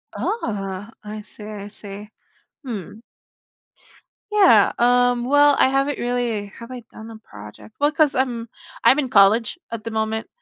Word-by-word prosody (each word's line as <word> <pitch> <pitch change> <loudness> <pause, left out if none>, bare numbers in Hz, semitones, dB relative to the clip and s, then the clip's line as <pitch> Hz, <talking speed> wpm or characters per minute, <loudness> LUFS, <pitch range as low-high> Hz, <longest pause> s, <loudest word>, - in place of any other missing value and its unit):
Oh, 205 - -3
I 210 0 -7
see, 210 - -13
I 210 -1 -7
see. 205 0 -8 0.6
Hmm. 215 -4 -7 1.3
Yeah, 420 -2 +5
um, 245 0 +3
well, 290 +1 +5
I - - +4
haven't 275 +2 0
really 240 -4 -2
have 230 +4 -12
I 250 -2 -8
done 220 +1 -11
a 225 - -10
project? 105 - -14
Well, 290 +1 +3
'cause 310 -2 +3
I'm 240 -3 -1 0.3
I'm 275 - +5
in 270 -4 -1
college 215 0 +4
at 230 -2 -5
the 230 - -4
moment 220 0 -2
230 Hz, 150 wpm, -21 LUFS, 210-255 Hz, 1.3 s, Yeah